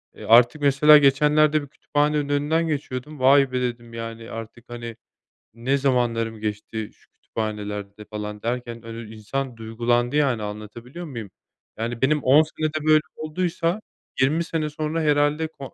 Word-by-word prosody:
eee, -, -, -10 dB
artık 120 Hz, +5 st, +5 dB
mesela 145 Hz, +2 st, +7 dB
geçenlerde 150 Hz, +2 st, +4 dB
bir 145 Hz, -, -9 dB
kütüphanenin 145 Hz, +1 st, 0 dB
önünden 155 Hz, +3 st, +1 dB
geçiyordum. 145 Hz, -1 st, -4 dB
"Vay 135 Hz, 0 st, +5 dB
be!" 125 Hz, 0 st, -1 dB
dedim 120 Hz, -1 st, -4 dB
yani, 115 Hz, 0 st, -7 dB
artık, 115 Hz, +1 st, -9 dB
hani, 120 Hz, -1 st, -7 dB, 0.6 s
"Ne 130 Hz, +4 st, 0 dB
zamanlarım 115 Hz, -4 st, 0 dB
geçti, 105 Hz, 0 st, -4 dB
şu -, -, -30 dB
kütüphanelerde." 105 Hz, -1 st, -5 dB
falan 105 Hz, -1 st, -6 dB
derken 120 Hz, -1 st, -4 dB
önü 115 Hz, -1 st, -8 dB
insan 125 Hz, +3 st, -4 dB
duygulandı 120 Hz, +3 st, 0 dB
yani, 130 Hz, -7 st, +2 dB
anlatabiliyor 115 Hz, +10 st, -8 dB
muyum? 115 Hz, -, -7 dB, 0.5 s
Yani 115 Hz, +2 st, -4 dB
benim 150 Hz, +2 st, +2 dB
10 140 Hz, +4 st, +7 dB
senede 155 Hz, 0 st, -3 dB
böyle 155 Hz, 0 st, +6 dB
olduysa 170 Hz, +4 st, -2 dB, 0.4 s
20 155 Hz, +6 st, +3 dB
sene 160 Hz, -2 st, -2 dB
sonra 155 Hz, +2 st, -2 dB
herhâlde 150 Hz, +1 st, +2 dB
ko 140 Hz, -4 st, -11 dB
130 Hz, 145 wpm, -23 LUFS, 115-150 Hz, 0.6 s, mesela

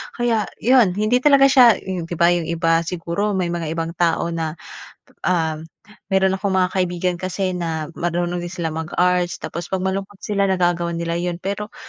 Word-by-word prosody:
Kaya 230 Hz, -4 st, 0 dB, 0.2 s
yun 235 Hz, -7 st, +4 dB
hindi 215 Hz, +4 st, +2 dB
talaga 280 Hz, 0 st, +5 dB
siya 245 Hz, -4 st, +7 dB
yung 185 Hz, -3 st, -4 dB
di 175 Hz, -, -5 dB
ba 170 Hz, +1 st, +4 dB
yung 175 Hz, -2 st, 0 dB
iba 165 Hz, 0 st, +2 dB
siguro 180 Hz, +4 st, -2 dB
may 180 Hz, -2 st, -1 dB
mga 170 Hz, -2 st, -3 dB
ibang 165 Hz, 0 st, -2 dB
tao 170 Hz, 0 st, +1 dB
na, 165 Hz, -1 st, -3 dB, 0.7 s
ah, 160 Hz, -3 st, +1 dB, 0.6 s
meron 190 Hz, 0 st, +3 dB
akong 195 Hz, 0 st, -1 dB
mga 185 Hz, -1 st, +2 dB
kaibigan 180 Hz, -1 st, 0 dB
kasi 185 Hz, +1 st, -2 dB
na 160 Hz, -3 st, -3 dB
marunong 175 Hz, +1 st, -1 dB
din 175 Hz, -, -5 dB
silang 165 Hz, -3 st, -3 dB
mag-arts 175 Hz, +2 st, 0 dB
tapos 170 Hz, 0 st, -5 dB
pag 190 Hz, -1 st, -2 dB
malungkot 195 Hz, +1 st, -3 dB
sila 200 Hz, -1 st, 0 dB
nagagawa 175 Hz, -2 st, +1 dB
nila 170 Hz, 0 st, -2 dB
yun. 175 Hz, 0 st, -2 dB
Pero 205 Hz, +2 st, -4 dB
180 Hz, 175 wpm, -21 LUFS, 170-195 Hz, 0.7 s, siya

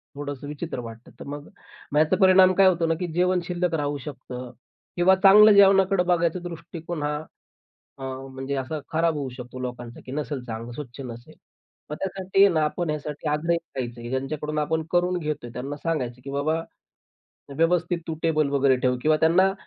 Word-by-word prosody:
थोडंसं 145 Hz, -1 st, -6 dB
विचित्र 150 Hz, -1 st, -5 dB
वाटतं. 115 Hz, 0 st, -10 dB
तर -, -, -8 dB
मग 145 Hz, +1 st, -7 dB, 0.5 s
ह्याचा 155 Hz, +4 st, +3 dB
परिणाम 185 Hz, 0 st, +7 dB
काय 195 Hz, 0 st, +6 dB
होतो 175 Hz, -2 st, +2 dB
ना, 165 Hz, -, +2 dB
की 180 Hz, -, -2 dB
जेवण 180 Hz, +1 st, +2 dB
शिल्लक 180 Hz, -1 st, -1 dB
राहू 145 Hz, -1 st, -1 dB
शकतं 125 Hz, -2 st, -8 dB, 0.5 s
किंवा 185 Hz, +2 st, +5 dB
चांगलं 210 Hz, +2 st, +9 dB
जेवणाकडे 195 Hz, -1 st, +5 dB
बघायचा 175 Hz, -1 st, +1 dB
दृष्टिकोन 165 Hz, -1 st, -6 dB
हा 150 Hz, 0 st, -1 dB, 0.8 s
अ, -, -, -8 dB
म्हणजे 135 Hz, +1 st, -5 dB
असा 135 Hz, +3 st, -3 dB
खराब 165 Hz, 0 st, +1 dB
होऊ 140 Hz, -2 st, -3 dB
शकतो 125 Hz, 0 st, -8 dB
लोकांचा, 120 Hz, -2 st, -6 dB
की 130 Hz, -, -8 dB
नसेल 145 Hz, -3 st, -4 dB
चांगलं, 115 Hz, 0 st, -6 dB
स्वच्छ 130 Hz, -1 st, -8 dB
नसेल. 120 Hz, 0 st, -10 dB, 0.6 s
मग 150 Hz, -, -4 dB
त्यासाठी 195 Hz, +1 st, +2 dB
ना 160 Hz, -4 st, +1 dB
आपण 170 Hz, +2 st, -2 dB
ह्यासाठी 150 Hz, 0 st, -4 dB
आग्रही 165 Hz, +3 st, +1 dB
राहायचं. 120 Hz, -7 st, -7 dB
ज्यांच्याकडून 150 Hz, +4 st, -3 dB
आपण 160 Hz, +2 st, 0 dB
करून 180 Hz, +1 st, +2 dB
घेतोय 150 Hz, -6 st, -4 dB
त्यांना 135 Hz, +4 st, -5 dB
सांगायचं, 130 Hz, -7 st, -3 dB
की 135 Hz, -, -8 dB
बाबा 155 Hz, +4 st, 0 dB, 1.0 s
व्यवस्थित 175 Hz, +1 st, +2 dB
तू 160 Hz, -, -3 dB
टेबल 155 Hz, -3 st, +2 dB
वगैरे 140 Hz, -2 st, +3 dB
ठेव 125 Hz, 0 st, +1 dB
किंवा 155 Hz, 0 st, +4 dB
त्यांना 185 Hz, +4 st, +4 dB
150 Hz, 170 wpm, -25 LUFS, 135-175 Hz, 1.0 s, चांगलं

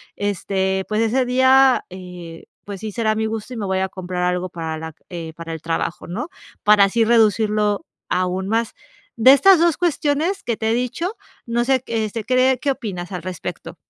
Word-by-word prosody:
este, 190 Hz, -1 st, -1 dB
pues 215 Hz, +1 st, 0 dB
ese 245 Hz, +3 st, +1 dB
día, 260 Hz, +1 st, +4 dB
eh, 180 Hz, -3 st, -10 dB, 0.2 s
pues 200 Hz, -2 st, -7 dB
sí 215 Hz, 0 st, -5 dB
será 220 Hz, -2 st, +1 dB
mi 220 Hz, 0 st, -1 dB
gusto 220 Hz, +2 st, -4 dB
y -, -, -6 dB
me 210 Hz, -, -3 dB
voy 190 Hz, -1 st, 0 dB
a 190 Hz, -, -1 dB
comprar 180 Hz, -1 st, -4 dB
algo 180 Hz, 0 st, 0 dB
para 160 Hz, -2 st, -5 dB
la, 160 Hz, -1 st, -7 dB, 0.2 s
eh, 165 Hz, -3 st, -6 dB
para 165 Hz, 0 st, -7 dB
el 160 Hz, -, -7 dB
trabajo, 165 Hz, +1 st, -3 dB
¿no? 240 Hz, -, -5 dB, 0.3 s
Para 210 Hz, -1 st, +6 dB
así 225 Hz, +4 st, +1 dB
reducirlo 215 Hz, -, +2 dB, 0.2 s
aún 185 Hz, +1 st, -1 dB
más. 225 Hz, +2 st, 0 dB, 0.4 s
De 255 Hz, +4 st, +8 dB
estas 360 Hz, +6 st, +6 dB
2 335 Hz, -2 st, +3 dB
cuestiones 335 Hz, +2 st, 0 dB
que 235 Hz, -, -1 dB
te 220 Hz, 0 st, 0 dB
he -, -, +2 dB
dicho, 290 Hz, -, -2 dB, 0.3 s
no 240 Hz, 0 st, 0 dB
sé 260 Hz, -1 st, +2 dB
q -, -, -47 dB
este 220 Hz, 0 st, -2 dB
cree 255 Hz, +2 st, +3 dB
¿qué 280 Hz, +1 st, 0 dB
opinas 195 Hz, -8 st, -5 dB
al 180 Hz, -, -4 dB
respecto? 180 Hz, -1 st, -6 dB
215 Hz, 195 wpm, -21 LUFS, 185-250 Hz, 0.4 s, De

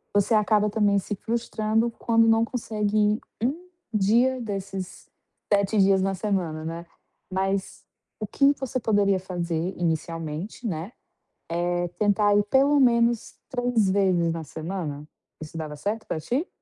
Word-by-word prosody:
você 205 Hz, +3 st, +3 dB
acaba 210 Hz, 0 st, +3 dB
também 205 Hz, -1 st, +2 dB
se 205 Hz, +2 st, -4 dB
frustrando 225 Hz, +1 st, -1 dB
quando 230 Hz, 0 st, +2 dB
não 225 Hz, 0 st, +4 dB
consegue 215 Hz, -3 st, -2 dB
ir 210 Hz, +1 st, +3 dB, 0.2 s
1 330 Hz, +8 st, -2 dB, 0.2 s
dia 235 Hz, +6 st, +3 dB
desses 195 Hz, -4 st, -6 dB, 0.4 s
7 200 Hz, +1 st, +2 dB
dias 195 Hz, -1 st, +4 dB
na 195 Hz, 0 st, 0 dB
semana, 180 Hz, -6 st, -2 dB
né. 165 Hz, +1 st, -5 dB, 0.5 s
Mas, 195 Hz, +1 st, -2 dB, 0.4 s
o 215 Hz, -, -3 dB
que 280 Hz, +6 st, +4 dB
você 260 Hz, -1 st, -3 dB
poderia 205 Hz, -4 st, +2 dB
fazer 175 Hz, -1 st, -3 dB
inicialmente, 165 Hz, +5 st, -3 dB
né, 175 Hz, +5 st, -4 dB, 0.6 s
é 175 Hz, +1 st, 0 dB
tentar 205 Hz, 0 st, +3 dB
ir 205 Hz, -, +4 dB
pelo 275 Hz, +5 st, +4 dB
menos 235 Hz, -2 st, +2 dB
3 245 Hz, -6 st, +1 dB
vezes 185 Hz, -4 st, +2 dB
na 165 Hz, -1 st, -5 dB
semana. 155 Hz, -2 st, -5 dB, 0.3 s
Isso 155 Hz, +1 st, -8 dB
dava 155 Hz, -2 st, -5 dB
certo 205 Hz, +9 st, -3 dB
para -, -, -2 dB
ti? 255 Hz, -, -1 dB
205 Hz, 140 wpm, -25 LUFS, 175-225 Hz, 0.6 s, não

